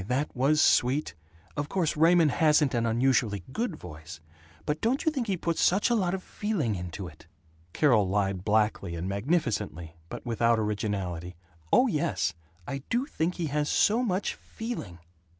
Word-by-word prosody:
That 135 Hz, +5 st, -1 dB
was 140 Hz, +4 st, +3 dB
sweet! 130 Hz, -, +3 dB, 0.4 s
Of 145 Hz, 0 st, -3 dB
course 175 Hz, -5 st, 0 dB
Raymond 165 Hz, 0 st, +5 dB
hasn't 150 Hz, -1 st, +3 dB
an 115 Hz, -1 st, +1 dB
unusually 115 Hz, -4 st, +1 dB
good 225 Hz, -, -2 dB
voice, 80 Hz, -, -10 dB, 0.5 s
but 150 Hz, +1 st, -2 dB
don't 250 Hz, +5 st, 0 dB
you 315 Hz, -, +3 dB
think 260 Hz, -6 st, -3 dB
he 195 Hz, -2 st, 0 dB
puts 170 Hz, -1 st, -1 dB
such 195 Hz, +6 st, +3 dB
a -, -, +4 dB
lot 190 Hz, -4 st, +1 dB
of 190 Hz, -, -7 dB
feeling 190 Hz, -, -2 dB
into 90 Hz, 0 st, -5 dB
it?" 80 Hz, 0 st, -15 dB, 0.4 s
Carol 110 Hz, -, +3 dB
lied 95 Hz, -2 st, 0 dB
blackly 105 Hz, -5 st, +1 dB
and 85 Hz, +3 st, -4 dB
magnificently, 100 Hz, -, -1 dB, 0.2 s
but -, -, -8 dB
without 115 Hz, 0 st, +2 dB
originality: 100 Hz, -5 st, -3 dB, 0.4 s
"Oh 255 Hz, -, +6 dB
yes, 105 Hz, -, 0 dB, 0.3 s
I 140 Hz, -, -3 dB
do 245 Hz, +3 st, +1 dB
think 175 Hz, -, -2 dB
he 170 Hz, -, -2 dB
has 150 Hz, 0 st, 0 dB
so 225 Hz, +4 st, +3 dB
much 200 Hz, -5 st, -1 dB
FEELING!" 225 Hz, -, -7 dB
130 Hz, 165 wpm, -28 LUFS, -, 0.5 s, Oh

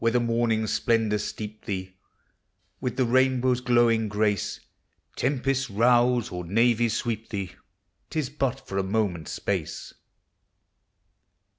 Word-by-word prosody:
Whether 115 Hz, +1 st, +3 dB
morning's 115 Hz, -2 st, +1 dB
splendors 110 Hz, -3 st, +1 dB
steep 105 Hz, 0 st, -7 dB
thee 95 Hz, -2 st, -4 dB, 0.9 s
With 125 Hz, -, -3 dB
the 130 Hz, -, +3 dB
rainbow's 130 Hz, 0 st, +2 dB
glowing 120 Hz, -3 st, +3 dB
grace, 105 Hz, -2 st, 0 dB, 0.6 s
Tempests 135 Hz, -1 st, 0 dB
rouse, 120 Hz, +2 st, +3 dB
or 90 Hz, 0 st, -4 dB
navies 115 Hz, +4 st, +2 dB
sweep 115 Hz, -2 st, -3 dB
thee, 100 Hz, -4 st, -4 dB, 0.6 s
T -, -, -5 dB
is 140 Hz, -4 st, -1 dB
but 135 Hz, -2 st, -2 dB
for 95 Hz, -, -2 dB
a -, -, +1 dB
moment's 95 Hz, -5 st, -1 dB
space. -, -, -3 dB
115 Hz, 120 wpm, -26 LUFS, 105-125 Hz, 0.9 s, Whether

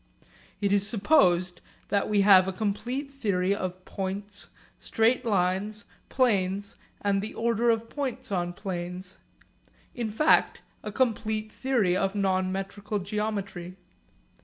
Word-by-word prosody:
It 200 Hz, -1 st, +1 dB
is 200 Hz, 0 st, +3 dB
supposed 185 Hz, -, +3 dB, 0.3 s
that 200 Hz, +1 st, +1 dB
we 205 Hz, -1 st, +3 dB
have 190 Hz, -2 st, +7 dB
a -, -, 0 dB
complete 240 Hz, +8 st, -3 dB
theory 200 Hz, -8 st, 0 dB
of 185 Hz, -2 st, -5 dB
points, 200 Hz, +1 st, -5 dB, 0.3 s
straight 225 Hz, +3 st, +1 dB
lines, 200 Hz, +1 st, 0 dB, 0.2 s
planes, 200 Hz, -5 st, +1 dB, 0.3 s
and 200 Hz, -1 st, +1 dB
the 215 Hz, -, -6 dB
order 235 Hz, +1 st, +1 dB
of 230 Hz, 0 st, +1 dB
points 260 Hz, -2 st, -4 dB
on 175 Hz, -2 st, -1 dB
planes 180 Hz, 0 st, -5 dB, 0.7 s
in 235 Hz, -3 st, -3 dB
fact, 305 Hz, +9 st, +3 dB, 0.2 s
a 210 Hz, -, -6 dB
complete 220 Hz, -2 st, -1 dB
theory 235 Hz, -10 st, +1 dB
of 195 Hz, +1 st, 0 dB
non 190 Hz, -2 st, +1 dB
metrical 200 Hz, +2 st, -4 dB
geometry. 200 Hz, -3 st, -4 dB
200 Hz, 125 wpm, -27 LUFS, 185-220 Hz, 0.7 s, have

